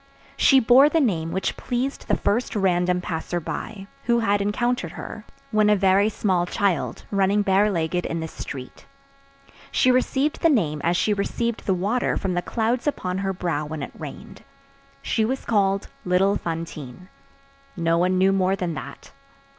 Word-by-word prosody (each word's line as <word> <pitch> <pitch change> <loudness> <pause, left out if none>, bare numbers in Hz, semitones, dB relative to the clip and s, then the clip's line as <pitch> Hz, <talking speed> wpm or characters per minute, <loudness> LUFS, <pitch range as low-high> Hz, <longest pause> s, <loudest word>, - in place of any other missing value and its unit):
She 270 - +5
bore 255 +4 +6
the 325 - +2
name 170 - 0
which 190 +3 -2
pleased 255 +3 -3
the - - +2
first 230 +4 -1
random 180 -2 +1
passer 175 0 -3
by, 195 +4 -6 0.2
who 235 0 +3
had 205 -3 +1
encountered 210 -3 -1
her, 220 -1 -8 0.3
when 215 -1 +3
a 210 - +5
very 195 +1 +3
small 185 -5 0
child, 195 -1 -1
running 200 +1 +2
bare 200 +2 +3
legged 175 -1 -1
in 165 - -3
the 160 - -4
street. 130 -4 -9 0.8
She 255 - +3
received 265 +3 +1
the 330 - +5
name 160 - +1
as 170 +1 +2
she 210 - +2
received 230 +3 -2
the 190 - +3
water 205 +8 0
from 190 -2 -2
the 175 - 0
clouds 235 +6 -1
upon 185 -10 -2
her 195 0 -1
brow 170 -5 -2
when 155 -2 -5
it - - -6
rained. - - -10 0.6
She 220 - 0
was 260 +4 -2
called 195 -3 +1 0.2
little 185 +2 +2
Fantine. 165 -2 -6 0.7
No 165 0 +1
one 185 +1 +2
knew 190 +1 +4
more 190 0 +2
than 180 -3 -3
that. - - -9
195 Hz, 170 wpm, -23 LUFS, 175-220 Hz, 0.8 s, bore